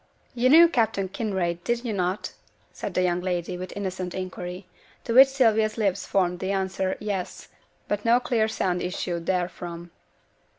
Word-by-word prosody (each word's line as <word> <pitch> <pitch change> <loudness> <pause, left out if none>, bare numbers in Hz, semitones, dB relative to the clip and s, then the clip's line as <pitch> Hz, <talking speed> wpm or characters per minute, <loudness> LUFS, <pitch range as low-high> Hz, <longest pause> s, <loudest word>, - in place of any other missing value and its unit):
'You 250 +1 +2
knew 330 +4 +9
Captain 220 - 0
Kinraid, 185 -4 -2
did 240 +1 -1
you 225 - -2
not?' 185 0 -2 0.4
said - - -6
the 185 - +2
young 180 0 +1
lady, 180 -1 -2
with 180 +1 -6
innocent 185 -2 -4
inquiry; 185 0 -6 0.4
to 230 - -2
which 265 +3 +9
Sylvia's 225 -5 +2
lips 200 -3 0
formed 180 -2 +1
the 190 +1 -2
answer, 190 -1 -1
'Yes,' 200 -4 -4 0.4
but 205 0 -2
no 235 +1 +4
clear 235 -3 +1
sound 180 -5 -1
issued 175 -2 -3
therefrom. 175 -2 -3
190 Hz, 160 wpm, -25 LUFS, 180-220 Hz, 0.4 s, knew